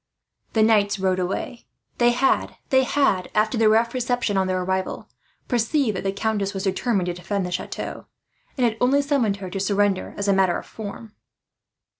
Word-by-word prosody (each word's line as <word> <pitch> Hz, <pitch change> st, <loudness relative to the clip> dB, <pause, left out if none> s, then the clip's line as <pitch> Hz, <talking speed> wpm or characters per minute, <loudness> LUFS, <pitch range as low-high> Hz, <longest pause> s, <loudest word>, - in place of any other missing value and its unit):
The 220 Hz, -, +4 dB
knights 205 Hz, -2 st, +3 dB
rode 190 Hz, -1 st, 0 dB
away. 190 Hz, +6 st, -4 dB, 0.3 s
They 240 Hz, 0 st, +5 dB
had, 265 Hz, +3 st, +1 dB, 0.3 s
after 215 Hz, -5 st, +1 dB
the 225 Hz, -1 st, +4 dB
rough 230 Hz, +2 st, +3 dB
reception 245 Hz, -4 st, -1 dB
on 190 Hz, -1 st, +2 dB
their 185 Hz, -1 st, -1 dB
arrival, 190 Hz, 0 st, -2 dB, 0.4 s
perceived 240 Hz, -1 st, +1 dB
that 185 Hz, -, -4 dB
the 195 Hz, -, 0 dB
countess 200 Hz, -1 st, -2 dB
was 195 Hz, -, -3 dB
determined 195 Hz, 0 st, 0 dB
to 175 Hz, -, -2 dB
defend 190 Hz, +2 st, -3 dB
the 180 Hz, -, -5 dB
chateau, 180 Hz, -, -5 dB, 0.5 s
and 250 Hz, -, +2 dB
had 225 Hz, -2 st, 0 dB
only 275 Hz, +3 st, +3 dB
summoned 255 Hz, -8 st, +1 dB
her 190 Hz, -2 st, -7 dB
to 195 Hz, -, -3 dB
surrender 200 Hz, 0 st, 0 dB
as 200 Hz, -, -2 dB
a 200 Hz, -, +4 dB
matter 190 Hz, -2 st, +2 dB
of -, -, -8 dB
form. 215 Hz, 0 st, -8 dB
205 Hz, 175 wpm, -23 LUFS, 190-235 Hz, 0.5 s, They